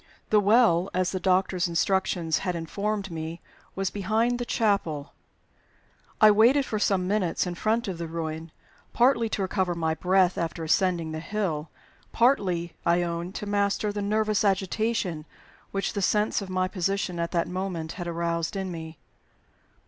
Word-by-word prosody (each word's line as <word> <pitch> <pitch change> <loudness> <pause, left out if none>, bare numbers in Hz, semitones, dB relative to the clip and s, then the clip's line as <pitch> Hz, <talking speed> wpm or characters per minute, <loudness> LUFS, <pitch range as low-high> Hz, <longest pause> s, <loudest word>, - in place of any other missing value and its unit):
The 215 - +6
Well, 205 -4 +4
as 185 0 +1
the 185 - -2
doctor's 185 0 +1
instructions 170 -1 +1
had 180 -2 -2
informed 200 +4 -3
me, 165 +1 -5 0.4
was 195 0 -1
behind 220 +5 0
the 245 - -2
chapel. 195 -11 0 1.1
I 215 -1 +8
waited 240 +7 +5
for 215 - -2
some 190 -3 +1
minutes 190 -4 0
in 180 - -3
front 220 +6 0
of 180 -3 -4
the 170 - -3
ruin, 160 0 -5 0.4
partly 235 -2 +3
to 200 - -1
recover 185 -2 0
my 160 -1 0
breath 185 +2 +2
after 165 0 -3
ascending 170 0 +1
the 155 - -4
hill; 165 -5 -3 0.4
partly, 185 -9 +2
I 175 +1 +3
own, 170 +1 -3
to 210 - -5
master 205 +1 0
the 205 - -3
nervous 215 0 +1
agitation 195 -4 0 0.4
which 195 0 -2
the 200 - -2
sense 210 +3 +1
of 195 - -7
my 185 0 0
position 185 -1 -2
at 170 0 -1
that 170 -1 +1
moment 180 -3 -4
had 175 -1 -6
aroused 170 +1 -2
in 190 -1 -3
me. 160 -2 -7
185 Hz, 160 wpm, -26 LUFS, 170-205 Hz, 1.1 s, I